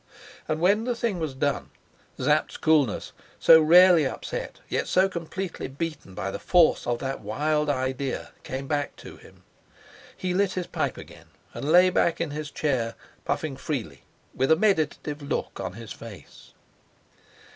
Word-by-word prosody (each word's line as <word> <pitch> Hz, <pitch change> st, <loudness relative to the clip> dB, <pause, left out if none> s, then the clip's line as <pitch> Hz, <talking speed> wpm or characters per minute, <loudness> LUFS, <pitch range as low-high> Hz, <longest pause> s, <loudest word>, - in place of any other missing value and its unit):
And 155 Hz, 0 st, -1 dB
when 200 Hz, +6 st, +3 dB
the 245 Hz, -1 st, -1 dB
thing 230 Hz, -6 st, -2 dB
was 155 Hz, -5 st, -3 dB
done, 140 Hz, +1 st, -1 dB, 0.5 s
Sapt's -, -, +1 dB
coolness, 150 Hz, -8 st, +2 dB, 0.3 s
so 160 Hz, 0 st, +8 dB
rarely 175 Hz, +1 st, +7 dB
upset, 135 Hz, -, -5 dB
yet -, -, -1 dB
so 185 Hz, +1 st, +4 dB
completely 185 Hz, +1 st, -5 dB
beaten 140 Hz, -, -6 dB
by 95 Hz, +1 st, -3 dB
the -, -, -5 dB
force 175 Hz, -8 st, +3 dB
of 120 Hz, -1 st, +1 dB
that 135 Hz, +2 st, -4 dB
wild 150 Hz, +8 st, 0 dB
idea, 130 Hz, 0 st, -2 dB
came 135 Hz, +1 st, -5 dB
back 145 Hz, 0 st, -2 dB
to -, -, -12 dB
him. -, -, -18 dB, 0.7 s
He 180 Hz, -1 st, -2 dB
lit 195 Hz, 0 st, +1 dB
his 180 Hz, -1 st, -3 dB
pipe -, -, -2 dB
again -, -, -12 dB, 0.3 s
and 145 Hz, -, -3 dB
lay 180 Hz, +2 st, +6 dB
back 170 Hz, -, +1 dB
in 170 Hz, -3 st, -2 dB
his 150 Hz, 0 st, -5 dB
chair, 130 Hz, -7 st, -1 dB, 0.3 s
puffing 155 Hz, -4 st, -2 dB
freely, 115 Hz, -, -5 dB, 0.3 s
with 130 Hz, +4 st, +1 dB
a -, -, +8 dB
meditative 155 Hz, -6 st, 0 dB
look 140 Hz, -, -3 dB
on -, -, -4 dB
his 115 Hz, +1 st, -10 dB
face. 110 Hz, -4 st, -13 dB
155 Hz, 155 wpm, -26 LUFS, 130-175 Hz, 0.7 s, so